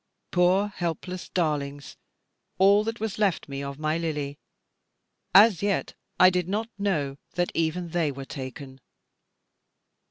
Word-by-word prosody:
Poor 185 +3 +3
helpless 180 -1 -4
darlings, 145 -4 -2 0.6
all 200 +2 +5
that 225 +1 -4
was 215 -2 -3
left 195 -7 +1
me 140 -1 -5
of 140 0 -5
my 155 +2 -1
Lily, 150 -4 -3 1.0
as 200 -2 +7
yet 200 -1 0 0.3
I 185 0 +8
did 180 -1 -1
not 220 +3 -1
know 150 -9 -1 0.2
that 175 0 0
even 165 +2 -1
they 165 -3 0
were 135 0 -8
taken. 130 0 -8
170 Hz, 130 wpm, -26 LUFS, 145-195 Hz, 1.0 s, I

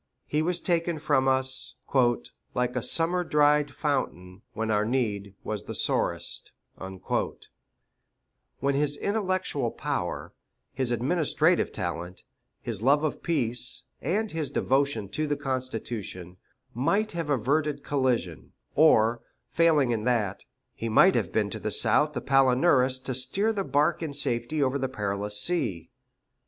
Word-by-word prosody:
He 150 - 0
was 175 +2 0
taken 170 -2 0
from 145 -3 +1
us 130 0 +1 0.8
"Like 125 0 0
a 125 - 0
summer 170 +7 +1
dried 150 -2 +3
fountain, 95 - -3
When 110 0 -2
our 105 0 +2
need 105 -5 -2
was - - -4
the - - -5
sorest;" - - -1 0.3
when 95 +7 -6
his 145 +1 +1
intellectual 185 - -1
power, 140 - -4 0.4
his 130 -2 -1
administrative 155 +7 +1
talent, 90 -1 -5 0.4
his 115 -4 -3
love 140 +5 +3
of 155 - -2
peace, 125 -7 0 0.2
and 205 +8 -1
his 160 -3 -3
devotion 135 -6 0
to 155 +8 -2
the 145 -1 -1
Constitution, 115 -9 -5 0.4
might 200 - +1
have 165 -3 -4
averted 145 +3 0
collision; 125 - -1 0.2
or, 120 -6 +4 0.3
failing 155 -6 +3
in 110 -2 -1
that, 110 -6 0 0.3
he 115 - -4
might 110 - +6
have - - -1
been - - 0
to - - -5
the - - -3
South 150 0 +3
the 125 - -3
Palinurus 130 0 +3
to 130 - -3
steer 165 - +1
the 200 -2 -1
bark 150 +1 +1
in 155 -3 -4
safety 140 +1 0
over 135 +1 0
the 135 -1 -1
perilous 105 -3 -1
sea. 105 - 0
135 Hz, 135 wpm, -27 LUFS, 115-155 Hz, 0.8 s, might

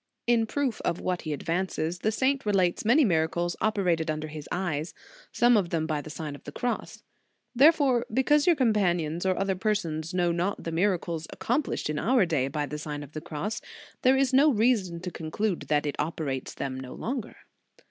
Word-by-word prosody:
"* - - -56
In 225 -1 +1
proof 270 -2 -1
of 170 - -1
what 180 -1 -2
he 155 - -4
advances, 170 +2 -2
the 215 - +1
saint 270 +4 +1
relates 190 -4 +1
many 255 +7 +5
miracles 170 -1 +1
operated 180 -7 +1
under 155 0 -3
his 150 -1 -8
eyes, 175 -4 -2 0.4
some 240 0 +4
of 195 -5 +2
them 160 -2 0
by 155 -2 -1
the 155 - -10
Sign 155 -1 -5
of 145 - -12
the 145 - -8
Cross. 245 +10 -4 0.5
Therefore, 265 -3 +4
because 285 +6 +3
your 345 - +6
companions 180 - +1
or 185 - +1
other 195 0 +1
persons 185 -6 -1
know 175 -1 +1
not 175 +4 -1
the 165 - -4
miracles 170 -2 0
accomplished 260 +4 -1
in 150 0 -2
our 240 -3 +3
day 150 -6 0
by 145 +1 -2
the 150 +1 -6
Sign 150 -1 -5
of 145 - -12
the 155 - -6
Cross, 200 +11 -4 0.4
there 260 +1 +5
is 265 -1 +2
no 285 +3 +6
reason 210 -7 +1
to 180 -1 -5
conclude 170 +1 -2
that 150 +1 +1
it 145 - -2
operates 150 -4 -3
them 130 -1 -4
no 130 -1 -8
longer. 245 -2 -4
180 Hz, 195 wpm, -27 LUFS, 155-225 Hz, 0.5 s, your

